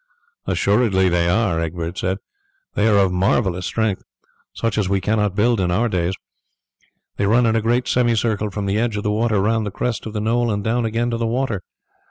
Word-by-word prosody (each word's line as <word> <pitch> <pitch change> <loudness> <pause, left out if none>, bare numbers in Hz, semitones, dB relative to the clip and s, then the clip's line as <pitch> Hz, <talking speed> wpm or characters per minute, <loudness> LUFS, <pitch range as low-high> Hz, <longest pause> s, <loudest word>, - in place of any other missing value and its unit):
"Assuredly 100 -3 +2
they 85 0 +1
are," 95 -3 +1
Egbert 85 +1 -3
said. 95 +1 -1 0.6
"They 105 - +2
are 105 -2 +4
of 95 -2 +3
marvellous 90 0 +1
strength, 110 -4 -1 0.5
such 115 -2 -2
as 95 -3 0
we 100 0 +2
cannot 105 0 0
build 115 +2 +2
in 90 -2 +1
our 105 +7 +1
days. 90 -3 -1 1.0
They 100 - +1
run 120 +4 +4
in 115 0 +2
a 115 - +2
great 120 +3 +1
semicircle 115 -3 +1
from 100 0 -4
the 100 +2 0
edge 115 -2 -1
of 105 - -3
the 105 - 0
water 110 -1 +1
round 110 +3 +1
the - - -1
crest 115 +3 -3
of 110 - -7
the 105 - -2
knoll 115 +2 +1
and 100 -1 -2
down 115 +2 0
again 115 +2 -1
to 115 - -1
the 115 0 -1
water. 115 -4 -1
105 Hz, 210 wpm, -20 LUFS, 95-115 Hz, 1.0 s, are